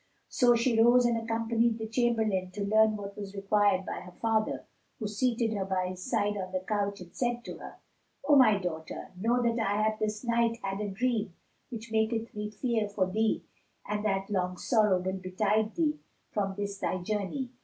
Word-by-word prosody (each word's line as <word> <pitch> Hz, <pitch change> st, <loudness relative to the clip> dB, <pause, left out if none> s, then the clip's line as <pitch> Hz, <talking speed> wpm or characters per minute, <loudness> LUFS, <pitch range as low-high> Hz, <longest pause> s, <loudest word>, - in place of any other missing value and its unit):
So 245 Hz, -1 st, +4 dB
she 235 Hz, -1 st, +3 dB
rose 240 Hz, +1 st, +6 dB
and 240 Hz, -1 st, +3 dB
accompanied 230 Hz, 0 st, +1 dB
the 220 Hz, -, -4 dB
chamberlain 220 Hz, -5 st, +1 dB
to 205 Hz, 0 st, -3 dB
learn 215 Hz, +1 st, +4 dB
what 200 Hz, -1 st, -7 dB
was 200 Hz, -1 st, -7 dB
required 195 Hz, -1 st, +2 dB
by -, -, -4 dB
her 180 Hz, -1 st, -12 dB
father, 220 Hz, -1 st, 0 dB, 0.3 s
who 220 Hz, -, -3 dB
seated 230 Hz, +1 st, 0 dB
her 200 Hz, -2 st, -1 dB
by 185 Hz, -1 st, -1 dB
his 185 Hz, 0 st, -7 dB
side 210 Hz, -4 st, 0 dB
on 185 Hz, -1 st, -4 dB
the 185 Hz, -1 st, -1 dB
couch, 200 Hz, -2 st, -1 dB
and 175 Hz, -1 st, -12 dB
said 240 Hz, -1 st, -1 dB
to -, -, -7 dB
her, -, -, -9 dB, 0.5 s
"O 295 Hz, -, +6 dB
my 250 Hz, -7 st, +6 dB
daughter, 160 Hz, -4 st, -5 dB
know 235 Hz, +6 st, +1 dB
that 235 Hz, 0 st, +1 dB
I 205 Hz, -1 st, +1 dB
have 215 Hz, 0 st, 0 dB
this 210 Hz, +1 st, -2 dB
night 235 Hz, -1 st, +1 dB
had 195 Hz, +1 st, -2 dB
a 210 Hz, -, -2 dB
dream 210 Hz, -2 st, -1 dB, 0.3 s
which 230 Hz, -2 st, -7 dB
maketh 225 Hz, +1 st, 0 dB
me 210 Hz, 0 st, -4 dB
fear 220 Hz, -1 st, -1 dB
for 200 Hz, -2 st, +1 dB
thee 220 Hz, +2 st, +1 dB, 0.4 s
and 210 Hz, 0 st, -2 dB
that 195 Hz, -1 st, -1 dB
long 180 Hz, -2 st, -1 dB
sorrow 210 Hz, -3 st, +3 dB
will 190 Hz, +1 st, -2 dB
betide 210 Hz, +4 st, 0 dB
thee 305 Hz, -3 st, +1 dB, 0.3 s
from 195 Hz, -2 st, -1 dB
this 200 Hz, 0 st, -4 dB
thy -, -, -1 dB
journey." 215 Hz, +6 st, -2 dB
215 Hz, 195 wpm, -29 LUFS, 195-230 Hz, 0.5 s, rose